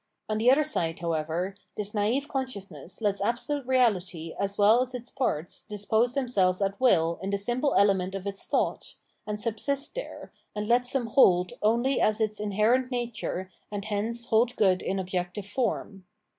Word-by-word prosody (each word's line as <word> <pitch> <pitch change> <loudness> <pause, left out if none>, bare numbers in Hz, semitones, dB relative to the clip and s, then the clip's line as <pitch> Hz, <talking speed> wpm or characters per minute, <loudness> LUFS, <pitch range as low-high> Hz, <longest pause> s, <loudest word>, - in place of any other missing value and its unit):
On 215 0 -1
the 235 +3 +4
other 280 +4 +5
side, 170 - 0
however, 165 +3 -2 0.2
this 210 0 -3
naive 225 +7 0
conscious 255 -9 -3
ness 155 +7 -8
lets 200 -2 0
absolute 245 +5 -1
Reality 190 -10 +1
as 200 0 -2
well 215 +4 +5
as 255 0 -3
its 245 0 -7
parts 175 - -2
dispose 220 +4 0
themselves 200 -9 +2
at 195 +2 -1
will 170 -9 +3
in 190 - -3
the 200 - 0
simple 240 +8 0
element 195 -2 +3
of 195 0 -5
its 200 0 -5
thought, - - -1 0.3
and 210 0 -3
subsist 240 +6 -1
there, - - -7 0.2
and 210 0 -3
lets 245 +2 +2
them 265 -3 0
hold 185 -7 +4
only 235 +5 +2
as 215 +1 +2
its 215 -1 -1
inherent 215 +5 +2
nature 235 -6 -3 0.2
and 205 -1 -4
hence 220 +3 -2
hold 235 +2 +2
good 190 -5 +3
in 195 - -2
objective 185 +1 -3
form. 205 -4 -3
210 Hz, 170 wpm, -27 LUFS, 190-245 Hz, 0.3 s, other